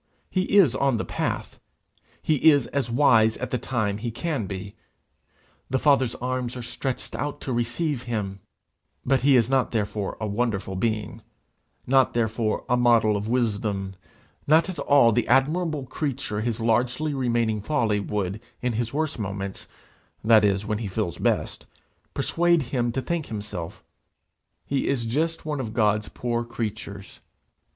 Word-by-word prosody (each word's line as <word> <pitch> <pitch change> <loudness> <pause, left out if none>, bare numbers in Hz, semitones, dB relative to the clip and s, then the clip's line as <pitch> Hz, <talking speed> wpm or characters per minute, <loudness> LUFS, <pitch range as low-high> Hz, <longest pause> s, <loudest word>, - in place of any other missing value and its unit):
He 185 +2 +1
is 155 - +6
on 135 -3 +2
the - - -3
path; - - -3 0.6
he 155 0 +4
is 145 -5 +4
as 140 -3 -2
wise 115 -3 +4
as - - -8
at - - -3
the 125 - 0
time 110 -5 -1
he 120 +2 -3
can 135 - -3
be; 100 +1 -6 1.0
the 130 - +1
Father's 130 -3 +3
arms 125 0 -3
are 125 - -6
stretched 130 +2 -4
out 145 0 -3
to 130 - -3
receive 125 +4 -1
him; 105 -6 -3 0.7
but 130 -1 +2
he 140 +1 +5
is 115 -3 +4
not 130 -1 +2
therefore 105 -2 -2
a 110 - -2
wonderful 105 -3 -1
being; 110 +2 -2 0.6
not 130 -1 +3
therefore 110 -1 0
a 125 - +3
model 120 -3 +4
of 100 +1 -3
wisdom; 105 -5 -1 0.5
not 160 +4 +4
at 185 - -5
all 140 -5 +5
the 120 +1 +1
admirable 150 +3 +2
creature 130 -6 -3
his 115 0 -2
largely 120 +7 +1
remaining 115 -5 0
folly 110 -4 +1
would, 100 0 -3 0.2
in 125 -1 -1
his 120 +1 -2
worst 155 -2 -2
moments, 100 -1 -4 0.6
that 110 -1 +6
is 100 0 +2
when 105 0 -1
he 110 - -3
feels 95 -3 -3
best, - - -1 0.5
persuade 170 -2 +2
him 120 -1 -1
to 130 +2 -3
think 170 +3 -2
himself; 105 -6 -6 0.8
he 140 -1 -1
is 125 -4 0
just 160 +8 -1
one 150 -2 -2
of 115 -4 -5
God's 105 -2 +2
poor 120 -1 -2
creatures. 110 -4 -6
120 Hz, 160 wpm, -25 LUFS, 105-135 Hz, 1.0 s, is